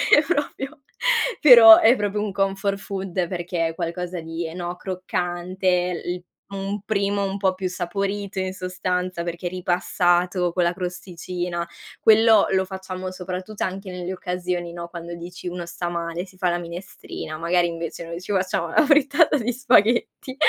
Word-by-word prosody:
è 295 - +6
proprio 290 -2 -2 0.6
però 235 -6 +10
è 230 +3 +6
proprio 205 -2 -1
un 210 -1 -2
comfort 195 0 0
food, 190 -3 -3
perché 175 -2 -2
è 165 - -6
qualcosa 175 +1 -4
di, 165 +1 -5
ehm, 160 - -8
no, 175 0 -4
croccante 180 0 -1
l 180 0 -3 0.3
un 195 +1 -4
primo 200 -1 0
un 195 0 -3
po' 190 -2 +1
più 185 0 -3
saporito 195 +2 -3
in 185 0 -2
sostanza, 185 -1 -3
perché 170 +1 -4
ripassato 180 0 +1
con 180 +1 +1
la 170 0 +1
crosticina, 175 -1 -4 0.4
quello 220 -1 +6
lo 190 0 +2
facciamo 185 -1 -6
soprattutto 185 +3 -5
anche 190 +1 -4
nelle 180 0 -5
occasioni, 180 -1 -3
no, 170 0 -6
quando 170 0 -8
dici: 175 +1 -9
"Uno 175 -1 -5
sta 175 0 -4
male, 170 +1 -3
si 185 -1 -19
fa 185 -1 +1
la 175 - 0
minestrina." 170 -2 -7
Magari 175 +2 +2
invece 170 0 -5
noi 170 +1 -6
ci 190 - -7
facciamo 185 -3 0
la 315 - +5
frittata 290 +1 +4
di 245 -1 -1
spaghetti. 245 +1 +2
185 Hz, 160 wpm, -23 LUFS, 175-200 Hz, 0.6 s, però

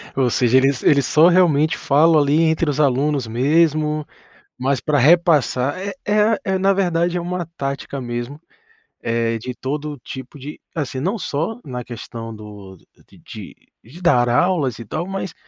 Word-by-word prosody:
Ou 130 -2 +2
seja, 125 +2 +3
eles 135 0 +2
eles 140 -4 +4
só 160 +2 +5
realmente 165 -4 +3
falam 155 +3 +4
ali 145 +3 +2
entre 160 -1 +1
os 145 - -2
alunos 140 -2 +1
mesmo, 150 +4 +1 0.5
mas 130 0 0
pra 150 -1 0
repassar 150 -2 +3
é 200 +1 -4
é 210 0 +2
a 220 +1 +2
é 190 -1 0
na 195 +1 +2
verdade 175 -2 0
é - - -2
uma 175 0 -4
tática 140 0 -4
mesmo, 120 +4 -5 0.6
eh, 115 0 -1
de 125 +3 -6
todo 145 +3 -4
o - - -10
tipo 130 +3 -9
de 145 +3 -9
assim, 135 -4 -4
não 190 - -1
só 175 +8 -3
na 125 -2 -6
questão 115 -1 -8
do 105 -3 -12 0.3
de - - -20
de - - -11 0.3
de 150 +11 -14
dar 120 -9 +3
aulas 140 - +1
e 115 - -8
tal, 160 - -4
mas 195 -1 -5
145 Hz, 175 wpm, -20 LUFS, 125-170 Hz, 0.6 s, só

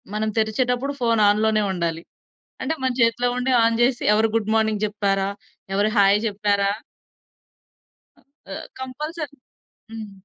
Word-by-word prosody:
మనం 215 0 0
తెరిచేటప్పుడు 250 +5 0
ఫోను 230 -2 +2
ఆన్‌లోనే 215 0 +2
ఉండాలి. 170 -1 -2 0.6
అంటే 320 - -1
మన 260 - +1
చేతిలో 230 +2 +3
ఉండి 250 +1 -1
ఆన్ 230 0 +2
జేసి 245 0 +2
ఎవరు 220 +1 +3
గుడ్ 220 -1 -1
మార్నింగ్ 220 -1 +1
జెప్పారా, 200 -2 0 0.4
ఎవరు 205 +2 +2
హాయ్ 200 +1 +5
జెప్పారా 200 -1 +1 1.8
ఆహ్, - - -6
కంపల్సరీ 295 +3 -6 0.5
హ్మ్. 220 -2 -7
220 Hz, 125 wpm, -22 LUFS, 205-245 Hz, 1.8 s, హాయ్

